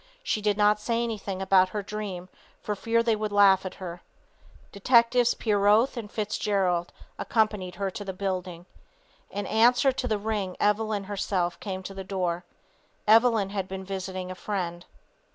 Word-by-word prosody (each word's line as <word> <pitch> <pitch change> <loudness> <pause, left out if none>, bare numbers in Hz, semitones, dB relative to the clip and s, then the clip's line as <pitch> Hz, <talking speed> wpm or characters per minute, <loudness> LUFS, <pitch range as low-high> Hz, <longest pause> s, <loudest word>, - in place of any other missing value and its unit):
She 215 - -1
did 205 -1 +1
not 210 0 +4
say 230 +2 -1
anything 200 -4 -4
about 185 -1 +4
her 205 +1 -4
dream 195 -4 -5 0.3
for 210 - -3
fear 230 +3 +1
they 230 -1 +2
would 215 0 -3
laugh 195 -2 +5
at - - -9
her. 175 -2 -8 0.7
Detectives 235 +3 +3
Pieroth 210 +4 +3
and 220 -4 -6
Fitzgerald 200 -5 -1 0.3
accompanied 210 -5 0
her 195 0 -2
to 205 - -6
the 195 - -4
building. 185 -2 -4 0.6
In 205 0 -4
answer 245 +4 +4
to 260 -1 -3
the 215 - 0
ring 205 -3 -3
Evelyn 210 0 +1
herself 190 -3 -2
came 190 -2 -5
to 195 - -7
the 195 0 -6
door. 180 -2 -2 0.6
Evelyn 225 -2 +4
had 195 -2 -3
been 190 0 -6
visiting 185 -1 -5
a - - -4
friend. 175 -3 -4
200 Hz, 160 wpm, -27 LUFS, 185-215 Hz, 0.7 s, laugh